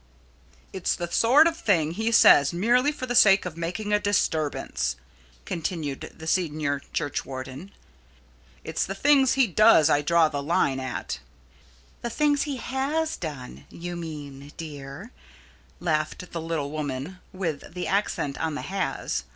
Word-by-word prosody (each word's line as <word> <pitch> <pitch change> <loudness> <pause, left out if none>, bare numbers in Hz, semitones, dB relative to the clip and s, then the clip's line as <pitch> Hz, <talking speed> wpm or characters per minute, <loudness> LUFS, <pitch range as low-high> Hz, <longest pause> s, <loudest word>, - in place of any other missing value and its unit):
"It's 190 -2 -1
the 175 -1 -5
sort 265 +7 +5
of 335 -1 +2
thing 165 - +1
he 220 +6 -1
says 145 -10 +7
merely 240 +10 +3
for 275 -3 -6
the 245 - -3
sake 200 -5 +6
of 175 -3 -5
making 180 +6 -3
a 210 - +4
disturbance," 155 - -1 0.5
continued 160 -4 -4
the 160 - -9
senior 155 -5 0
churchwarden. 135 +4 -4 0.9
"It's - - -2
the 195 - -4
things 275 +3 +4
he 270 -1 +4
does 185 -6 +5
I 145 - +3
draw 165 +1 +4
the 145 -2 -3
line 140 -3 +1
at." 130 -2 -4 0.8
"The 235 - -3
things 290 +4 +1
he 275 - -3
has 280 +6 -1
done, 145 -7 -8
you 175 +1 -7
mean, 145 -4 -8
dear," 150 - -8 0.7
laughed 155 +2 -2
the 165 - -4
little 160 -3 -3
woman, 150 +3 -4
with 170 -4 -5
the 180 - -3
accent 190 -8 -1
on 160 -2 -2
the - - -5
"has." 185 - -3
170 Hz, 145 wpm, -25 LUFS, 145-210 Hz, 0.9 s, says